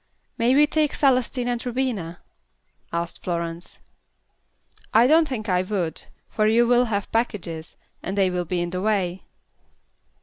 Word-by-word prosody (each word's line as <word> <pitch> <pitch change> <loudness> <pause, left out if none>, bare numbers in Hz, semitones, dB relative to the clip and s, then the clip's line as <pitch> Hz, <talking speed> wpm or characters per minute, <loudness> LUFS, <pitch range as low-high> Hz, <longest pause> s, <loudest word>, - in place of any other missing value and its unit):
"May 245 +2 +2
we 295 +1 +6
take 305 -1 +1
Celestine 255 -2 +2
and 240 -1 -2
Rubina?" 235 -9 -3 0.7
asked 170 0 -3
Florence. 170 -1 -4 1.2
"I 230 +2 +7
don't 315 +4 +5
think 225 -5 -4
I 180 -2 +2
would, 185 -4 -3 0.2
for 215 -1 +1
you 230 +2 +4
will 245 +1 +4
have 205 -4 -3
packages, 175 -8 -2 0.3
and 195 +2 -4
they 190 -2 +3
will 180 -1 -2
be 175 +1 -1
in 175 0 -3
the 180 0 -3
way." 190 -3 -1
215 Hz, 145 wpm, -24 LUFS, 175-245 Hz, 1.2 s, I